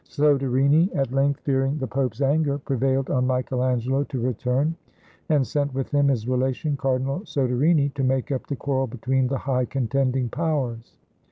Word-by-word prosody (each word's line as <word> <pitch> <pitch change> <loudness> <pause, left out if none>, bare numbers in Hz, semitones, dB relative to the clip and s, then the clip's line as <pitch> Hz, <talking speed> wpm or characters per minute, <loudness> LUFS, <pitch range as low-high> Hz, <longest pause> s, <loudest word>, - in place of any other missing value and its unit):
Soderini, 140 +2 +3
at 135 -3 0
length, 140 +1 +1
fearing 135 +1 0
the 135 - -2
Pope's 130 +1 -2
anger, 140 +1 +2
prevailed 135 -1 -1
on 125 -1 +1
Michael 125 0 -1
Angelo 130 +2 +1
to 135 -3 -5
re 125 +2 0
turn, 130 +8 0 0.5
and 145 -4 +3
sent 145 -1 -2
with 135 -1 -3
him 145 -1 +3
his 120 -5 0
relation, 130 +3 0
Cardinal 135 +1 -1
Soderini, 140 - +1
to 135 - -2
make 130 +1 0
up 130 - -3
the 140 - -2
quarrel 135 -1 -1
between 130 +2 0
the 135 +1 -1
high 130 -1 0
contending 130 0 0
powers. 130 -6 -3
135 Hz, 170 wpm, -24 LUFS, 130-140 Hz, 0.5 s, Soderini